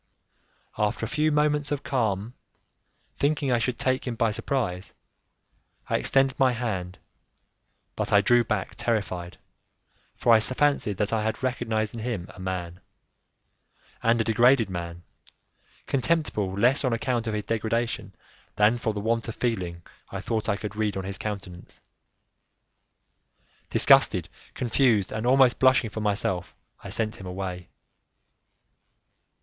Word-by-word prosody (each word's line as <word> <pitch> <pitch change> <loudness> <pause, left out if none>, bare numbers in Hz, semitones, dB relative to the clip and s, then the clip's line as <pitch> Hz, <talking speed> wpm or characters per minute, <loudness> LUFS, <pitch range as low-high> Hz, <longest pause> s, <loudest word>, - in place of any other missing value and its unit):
After 105 +1 0
a - - -4
few 150 +5 +1
moments 150 -1 +1
of 145 -1 -2
calm, 110 -4 -1 0.8
thinking 145 -2 +1
I 120 - +3
should 120 +1 -1
take 130 0 0
him 120 - -2
by 115 -1 +1
surprise, 105 -6 -2 1.0
I - - +3
extended 135 -1 +2
my 130 -2 +4
hand, 95 -7 -3 1.0
but - - -3
I 100 - +6
drew 120 +4 +4
back 110 -5 -2
terrified, 90 -6 -2 0.8
for 120 - +4
I 110 - +7
fancied 130 -4 +1
that 105 +2 -1
I 110 -1 +1
had 110 +3 -3
recognized 115 -4 -1
in 115 - -6
him 110 -6 -3
a - - -14
man, 90 -2 -4 1.2
and 115 +1 +3
a - - +3
degraded 120 -1 +4
man, 85 -1 -6 0.8
contemptible 135 - 0
less 120 +9 +3
on 130 -3 +1
account 115 0 -1
of 110 - -1
his 105 - -2
degradation 115 -3 -2 0.4
than 105 +3 +3
for 110 -2 -1
the 105 - -3
want 115 +2 0
of 115 - -5
feeling 90 -8 -2 0.3
I 95 - -5
thought 110 +1 -2
I 100 - +1
could 105 0 -6
read 105 -2 -1
on 95 - -3
his 95 +1 -5
countenance. 95 -4 -7 1.9
Disgusted, - - +5 0.3
confused, 120 -5 +2
and 110 +2 -2
almost 130 -1 +5
blushing 130 -4 +4
for 110 - -5
myself, 100 -4 -1 0.3
I - - -7
sent 110 -1 -2
him 95 - -9
away. 90 -1 -5
110 Hz, 140 wpm, -26 LUFS, 100-125 Hz, 1.9 s, I